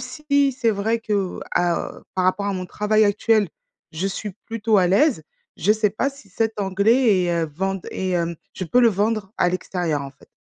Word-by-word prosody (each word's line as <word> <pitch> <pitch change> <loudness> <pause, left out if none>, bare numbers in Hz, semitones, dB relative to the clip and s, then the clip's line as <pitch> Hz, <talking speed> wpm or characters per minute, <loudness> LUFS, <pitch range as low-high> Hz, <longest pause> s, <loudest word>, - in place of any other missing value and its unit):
si 280 +2 +1
c'est 235 -2 +1
vrai 220 +3 0
que 205 -4 -2
à, 175 -1 0
heu - - -19
par 185 -1 0
rapport 185 +2 +1
à 200 - 0
mon 185 0 -4
travail 215 +2 +2
actuel, 210 -1 +2 0.4
je 175 +5 -2
suis 200 +1 -4
plutôt 225 -1 +1
à 180 - +4
l'aise, 220 - +3 0.3
je 200 - +1
sais 215 -2 +1
pas 270 +7 -1
si 275 -7 -17
cet 225 +1 -1
anglais 200 +1 +3
est, 175 - 0
heu, - - -4
vend 195 +2 -2
est, 185 -1 -3
hem 170 -1 0 0.2
je 185 - -4
peux 245 +9 +3
le 235 - +6
vendre, 210 0 -1
à 175 - +3
l'extérieur, 175 -4 -2
en 135 - -7
fait. - - -22
200 Hz, 210 wpm, -22 LUFS, 185-225 Hz, 0.4 s, le